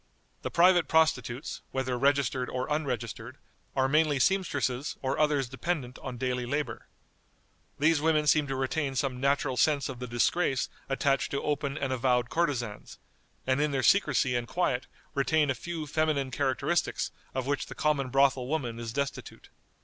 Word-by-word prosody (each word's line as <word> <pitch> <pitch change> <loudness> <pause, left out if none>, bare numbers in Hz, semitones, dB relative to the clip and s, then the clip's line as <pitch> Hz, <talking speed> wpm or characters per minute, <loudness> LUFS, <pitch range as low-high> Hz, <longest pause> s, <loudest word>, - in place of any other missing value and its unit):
The - - -3
private 175 0 +5
prostitutes, 150 -5 +1
whether 130 -1 -2
registered 135 -1 +1
or 130 0 -2
unregistered, 125 -7 -3 0.4
are 130 -1 +3
mainly 150 0 +3
seamstresses 145 -6 0
or 135 +3 -1
others 150 -4 +2
dependent 130 0 -3
upon 130 -2 -6
daily 125 0 -2
labor. 140 -4 -3 0.9
These 155 0 +3
women 155 -1 +2
seem 150 -1 +3
to 135 - -2
retain 135 +2 -1
some 130 -1 -1
natural 140 -1 +1
sense 145 -2 +2
of 130 -2 -7
the 125 - -5
disgrace 130 +4 +1 0.2
attached 135 0 +1
to 140 - -3
open 145 -1 -1
and 135 -2 -1
avowed 125 -1 +1
courtesans, 125 -11 -2 0.5
and 130 +2 +1
in 150 - +2
their 135 -2 -1
secrecy 140 -10 +3
and 120 -1 -1
quiet 135 -7 -1 0.3
retain 150 0 +2
a - - +1
few 160 +5 -5
feminine 150 -3 0
characteristics 130 0 0 0.2
of 130 -1 -1
which 140 0 -1
the - - -9
common 140 -4 0
brothel 135 -1 +3
woman 125 -6 -2
is 115 -1 -5
destitute. 140 +3 -5
135 Hz, 155 wpm, -29 LUFS, 125-150 Hz, 0.9 s, private